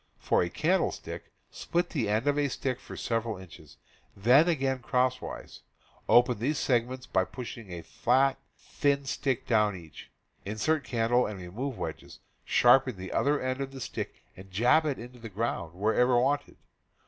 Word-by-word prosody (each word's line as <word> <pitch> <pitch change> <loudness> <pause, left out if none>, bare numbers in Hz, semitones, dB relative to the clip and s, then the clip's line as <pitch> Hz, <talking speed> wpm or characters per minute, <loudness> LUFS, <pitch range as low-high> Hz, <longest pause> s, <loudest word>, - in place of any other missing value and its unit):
For - - +1
a 85 - 0
candlestick, 170 - -1 0.2
split 175 +1 -2
the 120 -10 -1
end 110 +4 +1
of 145 0 +2
a 145 -1 +1
stick 130 -1 -2
for - - -10
several 115 -2 -2
inches, 95 -3 -14 0.4
then 125 - +5
again 135 -5 0
crosswise; 125 +1 -2 0.5
open 120 -2 +5
these 145 +6 0
segments 125 0 0
by 95 - +1
pushing 115 -2 -8
a 85 -1 -6
flat, 135 +3 +2 0.2
thin 140 -1 0
stick 135 -1 -1
down 105 -4 +2
each; 80 -6 -12 0.3
insert 140 +10 0
candle, 120 0 +1
and 105 -2 -6
remove 110 +9 -5
wedges; - - -6 0.3
sharpen 125 -2 +4
the 95 0 -7
other 145 +1 +2
end 130 +1 -2
of 135 0 -4
the 135 - -8
stick, - - -6
and 95 +1 -12
jab 120 - +3
it 140 - -1
into 125 +1 -10
the 115 -1 -8
ground 100 -5 -3
wherever 120 +5 +3
wanted. 140 +4 0
125 Hz, 160 wpm, -29 LUFS, 110-135 Hz, 0.5 s, then